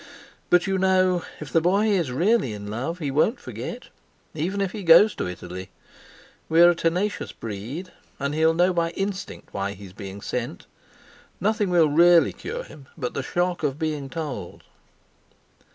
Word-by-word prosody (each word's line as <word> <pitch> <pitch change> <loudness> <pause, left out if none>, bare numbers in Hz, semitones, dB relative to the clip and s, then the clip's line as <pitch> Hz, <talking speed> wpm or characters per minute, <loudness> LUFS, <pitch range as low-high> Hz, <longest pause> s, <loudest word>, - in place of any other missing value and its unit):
But 180 0 +4
you 195 -1 0
know 185 -2 +3 0.2
if 150 -3 -8
the 165 - +4
boy 195 +5 +3
is 185 -11 +1
really 170 - +2
in 105 0 -7
love, 135 +10 -3
he 150 -6 -3
won't 155 - +2
forget, - - -7 0.4
even 175 +6 -2
if 195 -2 0
he 210 - -6
goes 190 +5 +7
to - - -3
Italy. 90 +1 -7 0.8
We're 170 +2 +7
a - - -2
tenacious 180 +5 -1
breed; 115 - -7 0.3
and 140 +1 -2
he'll 160 +1 +3
know 180 +2 +3
by 170 -1 +1
instinct 195 0 -5
why 100 0 -2
he's 100 -2 -12
being 100 -1 -8
sent. 120 -6 -4 0.7
Nothing 210 0 +1
will 170 -3 +4
really 170 +3 +5
cure 485 +4 -6
him 140 - -14
but 125 -6 -3
the - - -2
shock 175 +5 -1
of 145 -3 -1
being 150 -4 -3
told." 130 - -6
165 Hz, 165 wpm, -24 LUFS, 130-185 Hz, 0.8 s, goes